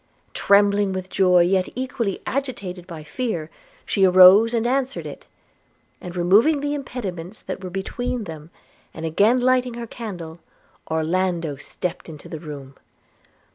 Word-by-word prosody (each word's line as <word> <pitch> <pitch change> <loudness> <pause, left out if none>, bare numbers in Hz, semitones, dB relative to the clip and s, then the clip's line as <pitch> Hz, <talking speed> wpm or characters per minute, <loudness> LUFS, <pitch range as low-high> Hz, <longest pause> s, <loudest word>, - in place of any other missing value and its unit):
Trembling 200 -1 +3
with 185 0 -5
joy, 180 -2 +4
yet 185 +1 +1
equally 240 -5 -3
agitated 200 -10 -4
by 165 -4 -8
fear, 160 -1 -4 0.3
she 195 - +1
arose 185 +4 +8
and 235 -1 0
answered 265 +2 -1
it; - - -9 0.7
and 180 0 -8
removing 205 - +4
the 290 +1 -2
impediments 210 - -6
that 190 - -6
were 185 - -5
between 225 +6 -3
them, 160 -4 -9 0.5
and 160 - -5
again 205 +10 +3
lighting 250 -1 +2
her 235 0 -5
candle, 175 -9 -8 0.5
Orlando 165 -1 -1
stepped 175 +5 -6
into 150 -2 -11
the 160 - -7
room. 145 -4 -9
190 Hz, 135 wpm, -22 LUFS, 170-235 Hz, 0.7 s, arose